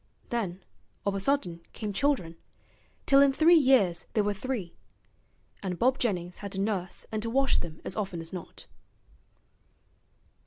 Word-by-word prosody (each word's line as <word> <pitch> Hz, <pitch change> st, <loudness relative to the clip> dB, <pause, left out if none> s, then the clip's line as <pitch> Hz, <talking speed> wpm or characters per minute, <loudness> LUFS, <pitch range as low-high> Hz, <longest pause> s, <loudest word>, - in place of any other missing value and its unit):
Then 195 Hz, -6 st, -3 dB, 0.4 s
of 200 Hz, -, +1 dB
a 195 Hz, -, -1 dB
sudden 190 Hz, -7 st, 0 dB
came 210 Hz, -2 st, -4 dB
children, 220 Hz, -, 0 dB, 0.7 s
till 275 Hz, -1 st, +6 dB
in 280 Hz, -1 st, +6 dB
three 315 Hz, +5 st, +5 dB
years 255 Hz, -, +4 dB
there 215 Hz, -, +2 dB
were 205 Hz, 0 st, 0 dB
three; 200 Hz, -4 st, -4 dB, 0.9 s
and 185 Hz, -3 st, -3 dB
Bob 260 Hz, +5 st, +2 dB
Jennings 180 Hz, -6 st, -2 dB
had 200 Hz, -1 st, -6 dB
to 195 Hz, -, -3 dB
nurse 195 Hz, -3 st, -2 dB
and 215 Hz, -1 st, -2 dB
to 230 Hz, -, -2 dB
wash 270 Hz, +3 st, +3 dB
them 160 Hz, -2 st, -7 dB
as -, -, -2 dB
often 195 Hz, -5 st, -3 dB
as 165 Hz, +1 st, -8 dB
not. 180 Hz, -3 st, -8 dB
205 Hz, 155 wpm, -28 LUFS, 180-260 Hz, 0.9 s, till